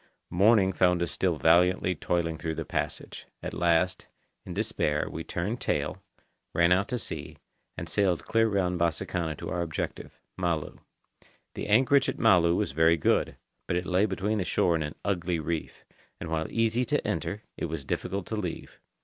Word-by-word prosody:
Morning 95 +1 +4
found 90 -1 +3
us 85 - -3
still 90 -3 0
vainly 90 +3 +4
toiling 85 -1 -1
through 80 -1 -3
the 80 0 -4
passage. - - -4 0.2
At - - -4
last, 90 +2 +1 0.4
in 90 - -6
despair, 95 -8 0
we 80 - -5
turned 100 +10 -3
tail, 75 +6 -1 0.5
ran 85 +1 +4
out 95 +3 +3
to 125 - -2
sea, 75 - -6 0.4
and 85 +1 -5
sailed 95 -1 +1
clear 115 0 +3
round 90 -4 0
Bassakanna 85 0 -1
to - - -6
our 90 - -1
objective, 80 -3 -5 0.2
Malu. 85 -4 -2 0.7
The - - -5
anchorage 130 +6 +4
at - - -3
Malu 90 -6 +4
was - - 0
very 80 +3 +4
good, 75 - +1 0.3
but - - 0
it 90 - -2
lay 95 +3 +2
between 105 +2 -1
the - - +1
shore 90 -1 +2
and 80 -1 0
an 75 - -6
ugly 90 -3 0
reef, 80 +1 -4 0.3
and - - -6
while 80 0 -1
easy 115 +2 +1
to - - 0
enter, 105 +2 -2
it - - -3
was 80 -4 -4
difficult 95 +6 -3
to 110 - -4
leave. 90 -6 -5
90 Hz, 175 wpm, -28 LUFS, 80-100 Hz, 0.7 s, Morning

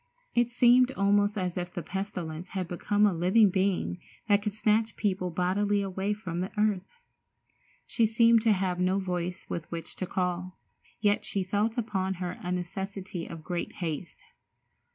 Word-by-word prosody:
It 240 0 +3
seemed 245 +1 +5
almost 205 0 +2
as 180 -2 -2
if 175 0 -3
the 175 - -5
pestilence 180 -2 -5
had 185 -2 -1
become 205 +4 +1
a 205 - +3
living 185 +5 +4
being 185 - 0 0.3
that 205 -1 +4
could 210 -1 -2
snatch 220 +1 +1
people 185 -3 0
bodily 200 +4 +1
away 195 +1 -2
from 180 -5 -5
the 185 +2 -2
earth. 210 - 0 0.9
She 230 -2 +2
seemed 230 +1 +5
to 225 0 +4
have 185 -3 0
no 185 +1 +2
voice 180 -2 -3
with 170 -1 -5
which 165 -1 -6
to 185 - -3
call, 180 0 -2 0.4
yet 205 0 +2
she 195 - -1
felt 210 +5 0
upon 190 -5 -1
her 180 0 -3
a 180 - -3
necessity 185 0 -4
of 165 -2 -8
great 175 +1 -3
haste. 165 -2 -5
190 Hz, 165 wpm, -29 LUFS, 180-210 Hz, 0.9 s, seemed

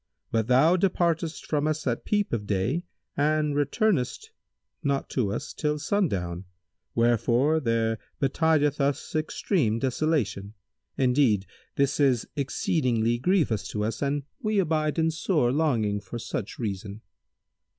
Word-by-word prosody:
But 110 -1 +1
thou 145 +8 +5
departest 170 -3 0
from 150 -1 0
us 155 0 -2
at 120 -3 -1
peep 205 - 0
of 105 -3 -2
day 110 - 0 0.3
and 150 0 +1
returnest 150 - 0 0.5
not 140 -2 -1
to 110 -7 0
us 110 - -4
till 150 -1 -1
sundown, 100 - -1 0.5
wherefore 120 +6 +3
there 115 -4 0 0.2
betideth 150 0 +2
us 140 +2 -1
extreme 155 - 0
desolation. 120 - -1 0.4
Indeed 125 -6 +3 0.3
this 140 +1 +1
is 130 -5 +3
exceeding 130 -4 0 0.2
grievous 130 - +1
to 105 +1 -3
us 110 +1 -3
and 140 0 0 0.2
we 215 -3 0
abide 155 -4 +1
in 160 0 +2
sore 155 -6 +1
longing 120 -9 +1
for 100 +4 -7
such 115 -1 -5
reason." 100 -1 -4
140 Hz, 130 wpm, -26 LUFS, 115-155 Hz, 0.5 s, thou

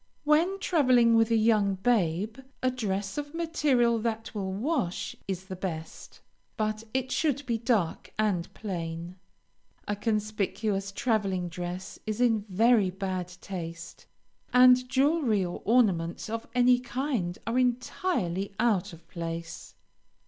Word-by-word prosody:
When 320 +6 +3
traveling 255 -11 +4
with 225 0 +4
a 230 - +3
young 215 -3 +3
babe, 205 +1 0 0.2
a 255 - +3
dress 200 -2 -2
of 290 +2 -7
material 280 -8 +2
that 225 0 -3
will 195 -3 -3
wash 220 - -2
is 190 -1 -4
the 190 -1 -6
best, 165 -4 -7 0.4
but 215 0 -1
it 260 +1 -2
should 285 -2 0
be 235 -2 -1
dark 220 -8 0
and 200 -5 0
plain. 170 -3 -5 0.7
A 205 - 0
conspicuous 210 -2 -1
traveling 195 -5 0
dress 180 +2 -6
is 215 +1 -2
in 225 -4 +2
very 215 +1 +4
bad 185 -1 -3
taste, 170 -3 -7 0.4
and 250 0 +6
jewelry 265 - +2
or 175 - -6
ornaments 195 -5 +2
of 225 0 -4
any 250 0 +5
kind 245 -8 -2
are 230 +3 +1
entirely 235 - -1
out 210 -5 +1
of 165 - -14
place. 165 -1 -6
215 Hz, 130 wpm, -28 LUFS, 185-250 Hz, 0.7 s, and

